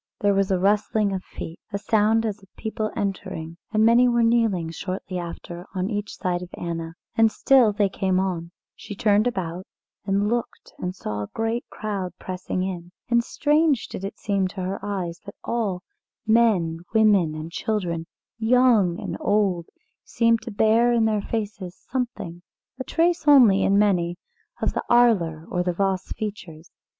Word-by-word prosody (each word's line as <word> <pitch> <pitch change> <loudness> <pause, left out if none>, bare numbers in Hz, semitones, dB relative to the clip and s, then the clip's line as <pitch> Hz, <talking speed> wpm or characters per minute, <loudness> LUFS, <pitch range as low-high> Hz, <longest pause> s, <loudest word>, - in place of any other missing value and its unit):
There 205 0 +3
was 195 -1 +1
a 190 - +2
rustling 205 +1 +1
of 190 -1 -3
feet, 165 - -8
a 200 - -1
sound 220 +2 +2
as 215 -1 -3
of 195 - -21
people 220 0 -3
entering, 170 -4 -4
and 215 0 +3
many 235 +2 +6
were 235 -1 +3
kneeling, 225 -8 +2
shortly 185 +1 -5
after, 170 0 -7
on 185 +3 -1
each 205 0 -4
side 180 -2 -1
of 180 - -8
Anna, 165 -1 -4 0.2
and 225 -1 +4
still 255 -4 +4
they 205 0 +2
came 190 -1 0
on; 175 -3 -2 0.3
she 205 - -9
turned 210 +2 +3
about 185 -5 -3 0.4
and 200 +1 +1
looked 235 +1 -3
and 180 +1 -3
saw 105 - -4
a 105 - -5
great 225 +2 -2
crowd 195 -5 -4
pressing 185 0 -4
in, 175 -2 -5 0.2
and 235 0 +3
strange 295 0 +2
did - - -7
it 200 +2 -5
seem 200 -2 0
to 190 +1 -7
her 190 +2 -4
eyes 185 -4 -3
that - - -8
all 200 -6 -2 0.4
men, 215 -8 +3 0.2
women, 200 -8 +4
and 155 +2 -6
children, 170 -5 -2 0.3
young 225 -6 +4
and 205 - -5
old 195 -5 +1 0.4
seemed 230 -1 +2
to - - -7
bear 220 +3 +3
in 230 -2 +3
their 215 -2 +1
faces 205 -4 -4
something, 240 -9 -3 0.4
a - - -2
trace 330 +1 +1
only 240 -9 +7
in 200 +1 +3
many, 175 -4 +2 0.5
of - - +1
the - - -2
Arler 190 -10 +3
or 180 - 0
the 180 0 0
Voss 190 0 -1
features. 180 -6 -7
200 Hz, 170 wpm, -24 LUFS, 180-225 Hz, 0.5 s, only